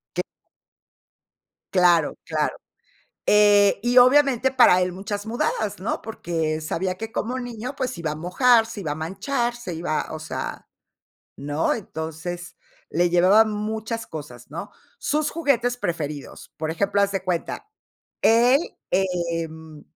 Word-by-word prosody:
Qué. - - 0 1.5
Claro, 175 -4 +4
claro, - - -1 0.7
eh, 205 -1 +5
y 240 +3 0
obviamente, 265 0 +5
para 240 -8 +6
él 180 - 0
muchas 205 +2 -5
mudadas, 220 -2 -1
¿no?, 200 +5 -3
porque 165 -8 -2
sabía 185 +4 -2
que, 225 +3 -7
como 250 +3 -2
niño, 245 +2 -6
pues 255 -1 -2
se - - -8
iba 160 -2 -2
a 150 - -4
mojar, 225 - +4
se 220 - -7
iba 160 -6 -4
a 145 - -1
manchar, 235 - -2
se 240 -8 -6
iba, 160 -2 -2
o 160 - -5
sea, 155 0 -6 0.7
¿no? 145 +3 0
Entonces, 170 -2 -6 0.3
le 175 +2 +2
llevaba 185 +5 +6
muchas 220 +1 -3
cosas, 135 -6 -9
¿no? 165 +3 -7 0.3
Sus 305 -10 0
juguetes 250 -7 +1
preferidos, 155 - -5
por 155 0 -3
ejemplo, 200 +4 +1
haz 200 0 +2
de 195 -2 -2
cuenta, 180 - -3 0.5
él, 240 +5 +5 0.3
em, 165 -4 -2
195 Hz, 140 wpm, -23 LUFS, 165-235 Hz, 1.5 s, para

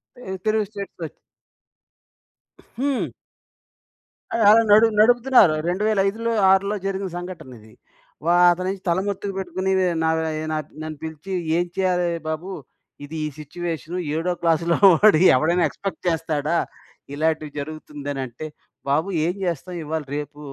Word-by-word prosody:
తె 250 - -13 0.2
తెలుగు 215 0 +2
స్టేట్స్‌ 200 -3 -8
వచ్ 155 - -7 1.6
హ్మ్. 275 -1 -1 1.2
అది 230 - +1
అలా 225 +2 +7
నడు 220 +2 +7
నడుపుతున్నారు 240 -6 +5
రెండు 185 +4 -1
వేల 215 -2 +1
ఐదులో 230 +3 -2 0.2
ఆరులో 200 +2 +2
జరిగిన 195 0 -2
సంఘటన 175 -6 -8
ఇది. 110 0 -18 0.5
వ - - -3 0.2
అతనేంచి 185 +2 -2
తలమత్తుకు 195 +2 -1
పెట్టుకుని 190 0 -2
నయి 185 -1 +2 0.6
నా 155 - 0 0.2
నన్ను 155 -1 -6
పిలిచి 160 +4 -7 0.3
ఏం 175 - +1
చేయాలి 180 -2 +1 0.2
బాబు? 160 +5 -4 0.5
ఇది 145 +3 -8
ఈ - - -1
సిట్యుయేషన్ 165 +2 -5 0.2
ఏడో 175 +2 0
క్లాస్‌లో 170 0 +2 0.2
వాడి 175 -1 +5
ఎవడైనా 170 +6 +2
ఎక్స్పెక్ట్ 195 0 -6
చేస్తాడా? 160 -1 0 0.6
ఇలాంటివి 155 0 -1
జరుగుతుందనినంటే 145 -3 -6 0.4
బాబు 155 +6 +1 0.2
ఏం 175 - 0
చేస్తాం 175 0 -3
ఇవాళ 155 +1 -3
రేపు 150 0 -7
175 Hz, 125 wpm, -22 LUFS, 155-195 Hz, 1.6 s, అలా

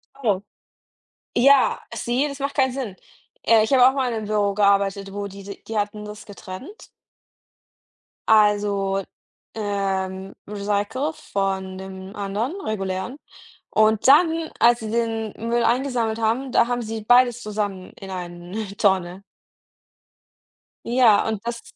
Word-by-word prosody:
Oh. 215 -9 0 0.9
Ja, 275 +2 +5
sie 250 +4 0
das 280 -1 -7
macht 280 +1 -3
keinen 260 -3 +2
Sinn, 240 -8 -5 0.5
äh, 225 -1 +5
ich 220 - -2
habe 255 -1 +7
auch 265 - +3
mal 265 -2 0
in - - -2
'nem 220 -1 -4
Büro 205 -1 +1
gearbeitet, 200 -1 +1
wo 205 0 -4
die 200 0 -11
die 200 0 -10
die 225 - -5
hatten 210 0 -2
das 210 0 -9
getrennt. 205 - -10 1.4
Also, 205 -2 +3 0.5
ähm, 195 -2 -2
recyclet 210 +9 -2
von 190 -1 -3
dem 190 0 -9
anderen 215 - -3
regulären. 195 +2 -3 0.5
Und 215 0 +2
dann, 320 +3 +5
als 240 0 +5
sie 215 -1 -5
den 225 -2 -1
Müll 235 +1 0
eingesammelt 235 -2 0
haben, 235 +4 0
da 235 - +4
haben 245 0 -1
sie 220 -1 -5
beides 245 0 +4
zusammen 205 -4 -4
in 195 -1 -9
eine 180 +3 -6
Tonne. 190 -1 +1 1.6
Ja, 235 -4 +4
und 220 -2 -2
das 235 0 -4
215 Hz, 135 wpm, -23 LUFS, 195-240 Hz, 1.6 s, habe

